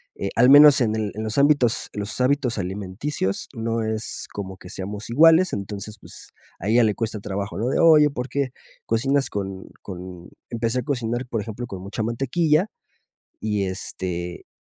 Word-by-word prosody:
eh, 100 Hz, -, -3 dB
al 125 Hz, +3 st, +5 dB
menos 145 Hz, 0 st, +9 dB
en 110 Hz, -2 st, +1 dB
el 110 Hz, -2 st, -2 dB
en 110 Hz, -, -4 dB
los 110 Hz, +2 st, -3 dB
ámbitos 140 Hz, -5 st, +3 dB
los 105 Hz, +4 st, -4 dB
hábitos 130 Hz, -2 st, +1 dB
alimenticios 95 Hz, +3 st, -3 dB
no 115 Hz, -1 st, -2 dB
es 110 Hz, 0 st, -4 dB
como 95 Hz, -2 st, -6 dB
que 90 Hz, -, -12 dB
seamos 100 Hz, +4 st, -6 dB
iguales, 165 Hz, +8 st, +5 dB
entonces 105 Hz, +2 st, -5 dB
pues -, -, -13 dB, 0.3 s
a 95 Hz, -, -5 dB
ella 120 Hz, +2 st, +5 dB
le 105 Hz, -2 st, +2 dB
cuesta 110 Hz, -2 st, -3 dB
trabajo, 100 Hz, 0 st, -4 dB
lo 115 Hz, +5 st, -1 dB
de -, -, 0 dB
oye 155 Hz, -3 st, +6 dB
porque 135 Hz, +1 st, -2 dB, 0.4 s
cocinas 135 Hz, +5 st, +1 dB
con 95 Hz, -2 st, -5 dB
con 90 Hz, -2 st, -9 dB, 0.2 s
empecé 115 Hz, +1 st, -1 dB
a -, -, -3 dB
cocinar 120 Hz, -3 st, -2 dB
por 115 Hz, -3 st, -2 dB
ejemplo, 110 Hz, +3 st, -6 dB
con 95 Hz, -4 st, -7 dB
mucha 100 Hz, +4 st, -4 dB
mantequilla 150 Hz, -, +1 dB, 0.7 s
y 105 Hz, -2 st, -1 dB
este 90 Hz, -2 st, -5 dB
110 Hz, 170 wpm, -23 LUFS, 100-130 Hz, 0.7 s, menos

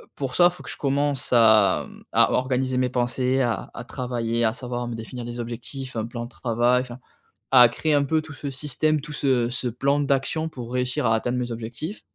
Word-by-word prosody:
pour 135 Hz, -2 st, -4 dB
ça 175 Hz, 0 st, +6 dB
faut 180 Hz, -, -11 dB
que -, -, -8 dB
je -, -, -4 dB
commence 140 Hz, 0 st, 0 dB
à, 110 Hz, -4 st, +5 dB
mmh, -, -, -15 dB
à -, -, +5 dB
organiser 130 Hz, 0 st, 0 dB
mes 125 Hz, 0 st, +1 dB
pensées, 125 Hz, +1 st, 0 dB
à 120 Hz, -3 st, -1 dB
à 115 Hz, -, -7 dB
travailler, 120 Hz, -2 st, -2 dB
à 110 Hz, -, +2 dB
savoir 120 Hz, -1 st, -4 dB
me 120 Hz, -, -4 dB
définir 115 Hz, +2 st, -7 dB
des 120 Hz, 0 st, -6 dB
objectifs, 125 Hz, +3 st, -7 dB
un 110 Hz, 0 st, -2 dB
plan 120 Hz, 0 st, -5 dB
de -, -, -10 dB
travail. 120 Hz, 0 st, +1 dB
Enfin 125 Hz, -1 st, -10 dB, 0.6 s
à 125 Hz, -2 st, +9 dB
créer 155 Hz, +6 st, -1 dB
un 145 Hz, -1 st, +3 dB
peu 155 Hz, +3 st, +1 dB
tout 155 Hz, -1 st, -10 dB
ce 145 Hz, 0 st, -6 dB
système, 150 Hz, +2 st, 0 dB
tout 150 Hz, +1 st, -8 dB
ce 130 Hz, -5 st, +1 dB
ce 125 Hz, 0 st, -2 dB
plan 140 Hz, +5 st, +1 dB
d'action 140 Hz, +3 st, 0 dB
pour 125 Hz, -6 st, -8 dB
réussir 125 Hz, +3 st, -1 dB
à 115 Hz, -, +3 dB
atteindre 120 Hz, +3 st, -1 dB
mes 120 Hz, -1 st, -2 dB
objectifs 115 Hz, -, -6 dB
125 Hz, 215 wpm, -24 LUFS, 120-140 Hz, 0.6 s, à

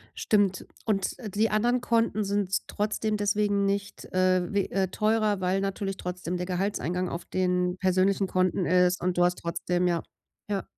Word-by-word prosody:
Stimmt, 200 Hz, -3 st, +1 dB, 0.2 s
und, 195 Hz, -4 st, 0 dB
äh, 220 Hz, -, -6 dB
die 215 Hz, +3 st, +1 dB
anderen 240 Hz, +4 st, +2 dB
Konten 230 Hz, -3 st, +1 dB
sind 200 Hz, -1 st, -1 dB
trotzdem 215 Hz, +1 st, -1 dB
deswegen 205 Hz, 0 st, +1 dB
nicht, 200 Hz, 0 st, -2 dB
äh, 185 Hz, -1 st, +1 dB
we 200 Hz, -1 st, +1 dB
äh, 190 Hz, -1 st, +1 dB
teurer, 215 Hz, 0 st, +1 dB
weil 185 Hz, +1 st, +1 dB
natürlich 195 Hz, -1 st, -3 dB
trotzdem 180 Hz, 0 st, -4 dB
der 180 Hz, -, -3 dB
Gehaltseingang 180 Hz, -1 st, -1 dB
auf 170 Hz, -, -5 dB
den 180 Hz, -1 st, 0 dB
persönlichen 190 Hz, +1 st, +2 dB
Konten 185 Hz, 0 st, +1 dB
ist 180 Hz, 0 st, +3 dB
und 180 Hz, 0 st, -1 dB
du 175 Hz, -, +4 dB
hast 180 Hz, 0 st, +2 dB
trotzdem 175 Hz, +1 st, -1 dB
ja, 170 Hz, -2 st, +1 dB, 0.5 s
ja. 195 Hz, -2 st, -1 dB
190 Hz, 165 wpm, -27 LUFS, 180-205 Hz, 0.5 s, du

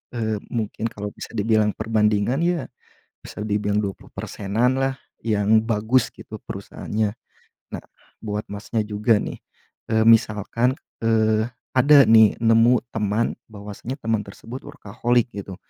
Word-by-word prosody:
eee, 110 Hz, -2 st, -1 dB, 0.2 s
mungkin 115 Hz, 0 st, -2 dB
kalau 105 Hz, 0 st, -5 dB
bisa -, -, -9 dB
dibilang 110 Hz, 0 st, +2 dB
perbandingan 110 Hz, +3 st, +1 dB
ya, 175 Hz, -1 st, 0 dB, 0.5 s
bisa -, -, -9 dB
dibilang 105 Hz, -1 st, 0 dB
20 100 Hz, -2 st, -6 dB
persenan 115 Hz, +6 st, -1 dB
lah 135 Hz, 0 st, 0 dB, 0.3 s
yang 110 Hz, 0 st, +3 dB
bagus 115 Hz, +2 st, +1 dB
gitu -, -, -10 dB
perusahaannya. 105 Hz, -1 st, -4 dB, 0.6 s
Nah -, -, -5 dB, 0.4 s
buat 105 Hz, -1 st, -3 dB
Masnya 105 Hz, +2 st, -2 dB
juga 105 Hz, +2 st, +2 dB
nih, -, -, -5 dB, 0.5 s
eee, 110 Hz, 0 st, +3 dB
misalkan, 115 Hz, +2 st, +3 dB, 0.3 s
eee, 110 Hz, -1 st, +2 dB, 0.3 s
ada 140 Hz, +2 st, +7 dB
nih 110 Hz, -2 st, +6 dB
nemu 115 Hz, +2 st, +4 dB
teman 105 Hz, +1 st, 0 dB, 0.2 s
bahwasanya 105 Hz, +4 st, -7 dB
teman 115 Hz, -2 st, 0 dB
tersebut 115 Hz, +5 st, -9 dB
workaholic 120 Hz, -3 st, -1 dB
gitu, 100 Hz, -2 st, -7 dB
110 Hz, 125 wpm, -23 LUFS, 105-115 Hz, 0.6 s, ada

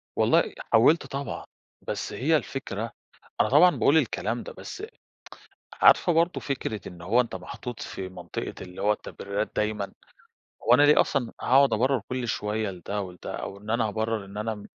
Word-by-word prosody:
والله -, -, +3 dB, 0.2 s
حاولت 150 Hz, +9 st, +5 dB
طبعًا. 140 Hz, +1 st, -5 dB, 0.4 s
بس -, -, -3 dB
هي 155 Hz, +5 st, +2 dB
الفكرة 115 Hz, -6 st, -4 dB, 0.5 s
أنا -, -, +2 dB
طبعًا 170 Hz, +6 st, +6 dB
باقول 145 Hz, -, +4 dB
الكلام 120 Hz, -4 st, 0 dB
ده -, -, -8 dB
بس 390 Hz, -, -8 dB, 1.0 s
عارفة 175 Hz, -, +6 dB
برضه 170 Hz, +2 st, +2 dB
فكرة 115 Hz, -7 st, -4 dB
إن 90 Hz, -1 st, -11 dB
هو 110 Hz, +8 st, +3 dB
أنت 120 Hz, -, -5 dB
محطوط 120 Hz, -2 st, -7 dB
في 95 Hz, -1 st, -6 dB
منطقة 95 Hz, -, -6 dB
اللي 90 Hz, 0 st, -8 dB
هو 105 Hz, -, +3 dB
التبريرات 100 Hz, 0 st, -4 dB
دايمًا. 105 Hz, -2 st, -1 dB, 0.7 s
هو 120 Hz, -, +5 dB
أنا 135 Hz, +4 st, +7 dB
ليه 145 Hz, +1 st, +7 dB
أصلًا 130 Hz, -5 st, -1 dB
هاقعُد 135 Hz, -1 st, +5 dB
أبرّر 130 Hz, +3 st, +2 dB
كل 125 Hz, -1 st, -2 dB
شوية 105 Hz, -1 st, -1 dB
لده 95 Hz, +3 st, -4 dB
و 95 Hz, -2 st, -6 dB
لده 90 Hz, -, -7 dB
أو 100 Hz, -, -6 dB
إن 105 Hz, +2 st, -12 dB
أنا 115 Hz, 0 st, +2 dB
أبرّر 110 Hz, -1 st, -2 dB
إن 100 Hz, +1 st, -10 dB
أنا 110 Hz, +1 st, -2 dB
م 105 Hz, -1 st, -11 dB
115 Hz, 175 wpm, -26 LUFS, 105-135 Hz, 1.0 s, أنا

